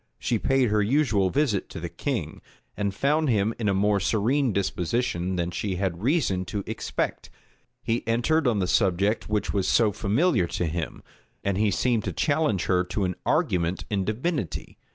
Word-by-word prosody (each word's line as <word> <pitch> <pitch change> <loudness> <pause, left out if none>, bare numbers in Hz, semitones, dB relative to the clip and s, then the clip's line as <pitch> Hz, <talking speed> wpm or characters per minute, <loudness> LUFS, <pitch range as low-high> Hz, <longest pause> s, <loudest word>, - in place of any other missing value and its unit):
She 115 - -1
paid 130 0 +2
her 105 0 +2
usual 105 -5 +2
visit 130 -5 0
to - - -7
the 85 - -4
king, 85 - -4 0.3
and 100 -1 -1
found 150 +8 +1
him 110 -1 +2
in 105 -3 +1
a - - +2
more 100 +1 +2
serene 115 +8 +1
disposition 95 0 -1
than 85 0 -1
she 95 +1 -2
had 90 -2 -2
reason 125 - +1
to 100 +3 -4
expect. 110 +1 -3 0.5
He 115 +1 0
entered 130 +6 +2
on 115 -4 +2
the 95 - +1
subject 100 +3 +1
which 105 -2 -1
was 100 -2 0
so 110 -3 +4
familiar 110 - +1
to 85 - -2
him; 80 0 -4 0.4
and 100 -1 0
he 105 +2 +2
seemed 115 +1 +1
to - - -2
challenge 145 - +1
her 90 -1 +2
to 95 +3 -2
an 90 -1 0
argument 85 0 +1
in 100 -2 +1
divinity. 115 - -3
105 Hz, 175 wpm, -26 LUFS, 95-120 Hz, 0.5 s, so